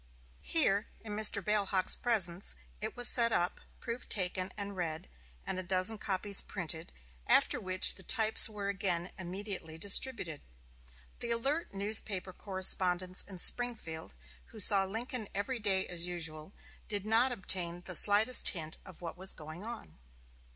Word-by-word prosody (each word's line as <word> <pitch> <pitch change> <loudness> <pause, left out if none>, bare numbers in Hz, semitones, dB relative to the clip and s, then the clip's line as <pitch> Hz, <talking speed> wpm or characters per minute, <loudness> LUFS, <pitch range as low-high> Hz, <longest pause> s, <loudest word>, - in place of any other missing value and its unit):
Here, 215 -10 -1
in 215 -2 -9
Mr. 210 -3 +5
Bailhache's 200 -3 0
presence, 195 -6 -2 0.3
it 220 +3 -7
was 245 - +4
set 235 -1 +5
up, 175 -4 -2 0.2
proof 235 0 -8
taken 185 -1 -2
and 200 -1 -7
read, 165 -4 -6 0.4
and 185 - -5
a - - -4
dozen 185 +4 0
copies 200 0 +1
printed; 165 -4 -6 0.4
after - - +2
which 185 -1 +3
the - - -14
types 220 +1 +5
were 205 -2 -7
again 185 -3 -2
immediately 185 -3 -7
distributed. 195 - +2 0.8
The 235 - -5
alert 270 +3 -3
newspaper 200 -2 +1
correspondents 185 -1 +2
in 195 -2 -9
Springfield, 195 -7 0 0.3
who 220 - -14
saw 195 -1 +8
Mr. - - -11
Lincoln 230 0 -3
every 235 +5 -4
day 195 -3 0
as 175 0 -3
usual, 160 -2 -6 0.4
did 205 -2 -3
not 230 +4 +1
obtain 180 -5 +1
the 180 - -2
slightest 215 +7 +4
hint 160 -3 -2
of 185 -3 -16
what 170 -1 -8
was 190 +1 +1
going 155 +4 -11
on. 220 - -10
195 Hz, 150 wpm, -30 LUFS, 180-220 Hz, 0.8 s, saw